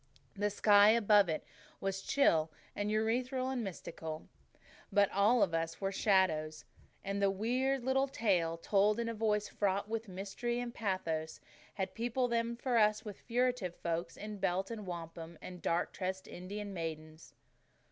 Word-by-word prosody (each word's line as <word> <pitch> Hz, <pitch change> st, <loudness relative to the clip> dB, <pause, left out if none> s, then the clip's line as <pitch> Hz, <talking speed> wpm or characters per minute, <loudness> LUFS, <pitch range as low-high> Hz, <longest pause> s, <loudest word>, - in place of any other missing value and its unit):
The 205 Hz, +1 st, +1 dB
sky 205 Hz, 0 st, +6 dB
above 210 Hz, -4 st, +5 dB
it 155 Hz, -, -1 dB, 0.4 s
was 195 Hz, 0 st, -2 dB
chill 165 Hz, -, +3 dB, 0.3 s
and 205 Hz, 0 st, -1 dB
ethereal 250 Hz, +4 st, 0 dB
and 250 Hz, -3 st, -2 dB
mystical. 160 Hz, -4 st, -6 dB, 0.6 s
But 205 Hz, -1 st, +4 dB
all 210 Hz, +4 st, +4 dB
about 165 Hz, -4 st, +1 dB
us 165 Hz, -, -12 dB
were 195 Hz, -1 st, -1 dB
shadows; 175 Hz, -7 st, +2 dB, 0.4 s
and 200 Hz, +1 st, -2 dB
the 200 Hz, -, +4 dB
weird 250 Hz, +6 st, 0 dB
little 265 Hz, +2 st, +2 dB
tale, 180 Hz, -10 st, +1 dB
told 205 Hz, +5 st, +2 dB
in 235 Hz, -, -1 dB
a 230 Hz, -, -2 dB
voice 210 Hz, -1 st, +1 dB
fraught 200 Hz, 0 st, 0 dB
with 225 Hz, 0 st, -3 dB
mystery 200 Hz, +6 st, -3 dB
and 245 Hz, -1 st, -4 dB
pathos, 165 Hz, -8 st, -2 dB, 0.4 s
had 190 Hz, -2 st, -3 dB
peopled 240 Hz, +2 st, -1 dB
them 235 Hz, 0 st, 0 dB
for 240 Hz, 0 st, +1 dB
us 215 Hz, +1 st, +3 dB
with 205 Hz, -3 st, -8 dB
furtive 245 Hz, -6 st, 0 dB
folk 170 Hz, 0 st, -3 dB
in 210 Hz, -1 st, -7 dB
belt 190 Hz, +3 st, 0 dB
and 215 Hz, -4 st, -6 dB
wampum, 165 Hz, -1 st, -7 dB
and 180 Hz, -1 st, -9 dB
dark 170 Hz, +1 st, 0 dB
tressed 190 Hz, 0 st, -4 dB
Indian 200 Hz, +3 st, -6 dB
maidens. 155 Hz, -2 st, -6 dB
200 Hz, 155 wpm, -34 LUFS, 180-230 Hz, 0.6 s, sky